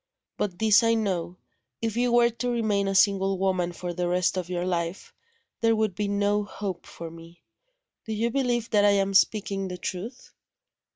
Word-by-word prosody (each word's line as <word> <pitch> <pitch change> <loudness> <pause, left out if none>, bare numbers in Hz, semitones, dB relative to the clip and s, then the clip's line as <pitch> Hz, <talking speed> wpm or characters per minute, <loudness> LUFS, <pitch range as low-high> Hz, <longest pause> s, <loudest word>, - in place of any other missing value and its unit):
But, 190 -4 -3
this 215 0 +5
I 230 0 +3
know: 185 -5 -2 0.4
if 225 -1 -2
you 245 0 +1
were 240 0 +4
to 235 +2 -3
remain 215 -4 0
a 195 - -1
single 195 0 +3
woman 185 -2 0
for 175 0 -5
the 175 0 -2
rest 180 +1 +1
of 180 -2 -3
your 175 -1 -2
life, 170 0 -3 0.5
there 225 -1 +3
would 215 -3 0
be 210 +2 -2
no 205 +1 +1
hope 195 -3 -6
for 165 -1 -8
Me. 165 +1 -14 0.6
Do 220 - -4
you 230 +2 0
believe 240 -3 0
that 205 -2 +4
I 205 0 +5
am 195 0 0
speaking 195 -1 +2
the 180 -1 -6
truth?" 190 +8 -6
200 Hz, 185 wpm, -26 LUFS, 180-220 Hz, 0.6 s, this